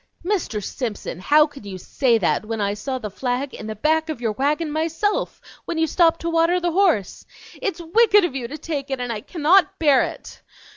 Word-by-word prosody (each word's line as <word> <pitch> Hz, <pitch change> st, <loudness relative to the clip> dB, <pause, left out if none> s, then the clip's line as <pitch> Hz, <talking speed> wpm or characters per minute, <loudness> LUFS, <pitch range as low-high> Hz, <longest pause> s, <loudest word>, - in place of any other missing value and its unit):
"Mr. 350 Hz, -, -1 dB
Simpson, 220 Hz, -6 st, -5 dB
how 300 Hz, +10 st, +5 dB
can 290 Hz, -6 st, -12 dB
you 195 Hz, -2 st, -7 dB
say 235 Hz, +6 st, +1 dB
that, 195 Hz, 0 st, 0 dB
when 225 Hz, +1 st, -4 dB
I 200 Hz, -1 st, 0 dB
saw 260 Hz, +6 st, -4 dB
the 215 Hz, -5 st, -6 dB
flag 255 Hz, +5 st, -3 dB
in 215 Hz, -, -8 dB
the 220 Hz, -, -5 dB
back 315 Hz, +7 st, +1 dB
of 305 Hz, -6 st, -4 dB
your 230 Hz, -3 st, -1 dB
wagon 295 Hz, +7 st, -1 dB
myself, 325 Hz, +7 st, -1 dB, 0.3 s
when 335 Hz, -, -4 dB
you 320 Hz, -, +3 dB
stopped 330 Hz, +1 st, +2 dB
to 335 Hz, -, -2 dB
water 335 Hz, +2 st, +3 dB
the 350 Hz, -1 st, -1 dB
horse? 335 Hz, -, +1 dB, 0.4 s
It's 380 Hz, -4 st, -2 dB
wicked 410 Hz, +3 st, +4 dB
of 350 Hz, -, -3 dB
you 250 Hz, -3 st, -3 dB
to 290 Hz, +5 st, -7 dB
take 295 Hz, -2 st, -5 dB
it, 270 Hz, -1 st, -3 dB
and 245 Hz, -1 st, -3 dB
I 210 Hz, -, -5 dB
cannot 335 Hz, -, +2 dB
bear 290 Hz, -5 st, +4 dB
it!" -, -, -6 dB
295 Hz, 210 wpm, -22 LUFS, 235-330 Hz, 0.4 s, how